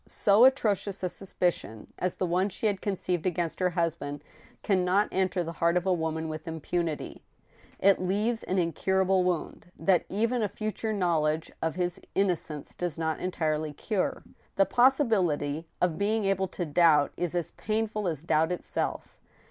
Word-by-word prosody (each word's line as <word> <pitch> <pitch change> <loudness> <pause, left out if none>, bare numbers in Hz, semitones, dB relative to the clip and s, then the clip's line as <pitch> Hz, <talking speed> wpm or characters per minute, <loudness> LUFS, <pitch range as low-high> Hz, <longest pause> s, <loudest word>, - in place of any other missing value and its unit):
So 205 +4 +5
atrocious 205 -7 +1
a 180 - +1
suspicion 175 - -3
as 180 -1 -1
the 185 - -1
one 180 +3 +1
she 205 - -5
had 200 -3 +1
conceived 185 -3 -1
against 175 -2 -2
her 185 -1 +2
husband 165 -4 -2 0.4
can 190 -3 +2
not 190 +3 +3
enter 185 -1 0
the 165 - -5
heart 170 +1 +4
of 180 - -1
a 190 - +3
woman 160 -1 -2
with 155 0 -6
impunity. 165 0 -3 0.6
It 195 -1 +4
leaves 210 +5 0
an 190 - -2
incurable 190 +2 +2
wound, 180 -1 -2
that 175 +2 +2
even 230 +4 0
a 210 - 0
future 215 +2 -3
knowledge 160 -5 0
of 160 0 -1
his 180 -1 -2
innocence 175 -6 -1
does 175 -3 -3
not 160 -1 -1
en 185 - -2
tirely 155 -3 -1
cure. 200 +5 -2 0.3
The 195 - +4
possibility 190 - +2
of 180 -1 +1
being 210 +1 +1
able 195 -1 +1
to 180 - -4
doubt 155 -2 +4
is 175 -1 -2
as 175 -2 -2
painful 215 -2 -2
as 155 -3 -3
doubt 160 0 +2
itself. 180 - -3
180 Hz, 165 wpm, -28 LUFS, 160-200 Hz, 0.6 s, So